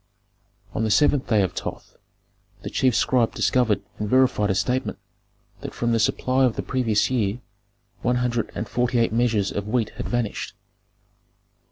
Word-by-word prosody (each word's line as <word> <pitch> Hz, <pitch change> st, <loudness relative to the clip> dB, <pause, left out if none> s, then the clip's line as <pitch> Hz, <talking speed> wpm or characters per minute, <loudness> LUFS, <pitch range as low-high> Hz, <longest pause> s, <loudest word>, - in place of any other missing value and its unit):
"On 110 Hz, -, -1 dB
the 110 Hz, -, 0 dB
seventh 140 Hz, +5 st, +3 dB
day 105 Hz, -4 st, +3 dB
of 95 Hz, -, -2 dB
Thoth -, -, -7 dB, 0.7 s
the -, -, -5 dB
chief 130 Hz, -3 st, +2 dB
scribe 120 Hz, -3 st, +2 dB
discovered 120 Hz, -5 st, +2 dB, 0.2 s
and 105 Hz, -1 st, -2 dB
verified 130 Hz, -5 st, +3 dB
a 95 Hz, -, +1 dB
statement 125 Hz, +6 st, -1 dB, 0.6 s
that -, -, -8 dB
from 120 Hz, 0 st, 0 dB
the 115 Hz, -, +2 dB
supply 130 Hz, +4 st, +1 dB
of 125 Hz, -4 st, +2 dB
the -, -, -3 dB
previous 120 Hz, -4 st, +1 dB
year 110 Hz, -3 st, 0 dB, 0.6 s
one 125 Hz, +1 st, +1 dB
hundred 120 Hz, -2 st, -1 dB
and 105 Hz, -, -3 dB
forty 120 Hz, +3 st, 0 dB
eight 115 Hz, -2 st, +2 dB
measures 115 Hz, -4 st, +1 dB
of 100 Hz, 0 st, -4 dB
wheat 110 Hz, -1 st, 0 dB
had -, -, -4 dB
vanished. 120 Hz, -3 st, -2 dB
120 Hz, 165 wpm, -24 LUFS, 105-125 Hz, 0.7 s, seventh